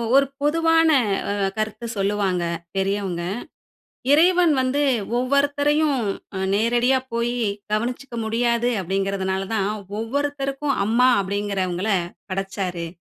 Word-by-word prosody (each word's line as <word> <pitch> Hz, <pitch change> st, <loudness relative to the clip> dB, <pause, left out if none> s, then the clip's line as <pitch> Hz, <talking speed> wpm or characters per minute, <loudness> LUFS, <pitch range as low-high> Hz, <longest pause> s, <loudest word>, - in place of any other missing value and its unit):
ஒ -, -, -2 dB
ஒரு 275 Hz, -, +5 dB, 0.2 s
பொதுவான 325 Hz, +2 st, +3 dB, 0.4 s
அ -, -, +1 dB, 0.2 s
கருத்து 215 Hz, +2 st, -3 dB
சொல்லுவாங்க 195 Hz, -3 st, 0 dB, 0.3 s
பெரியவங்க. 195 Hz, -2 st, -1 dB, 0.9 s
"இறைவன் 345 Hz, +1 st, +5 dB
வந்து 260 Hz, +3 st, +1 dB, 0.4 s
ஒவ்வொருத்தரையும் 285 Hz, +2 st, +2 dB, 0.4 s
அ -, -, -2 dB, 0.2 s
நேரடியா 240 Hz, +5 st, +3 dB
போயி 240 Hz, +1 st, -1 dB, 0.3 s
கவனிச்சுக்க 240 Hz, +3 st, -2 dB
முடியாது 235 Hz, +1 st, +1 dB
அப்பிடிங்கிறதனால 195 Hz, +1 st, -1 dB
தான், 200 Hz, -2 st, +1 dB, 0.3 s
ஒவ்வொருத்தருக்கும் 275 Hz, +2 st, -1 dB
'அம்மா' 245 Hz, +4 st, +4 dB
அப்பிடிங்குகிறவங்கள 195 Hz, -1 st, -2 dB, 0.4 s
படைச்சாரு. 190 Hz, -3 st, -3 dB
235 Hz, 95 wpm, -23 LUFS, 195-280 Hz, 0.9 s, ஒரு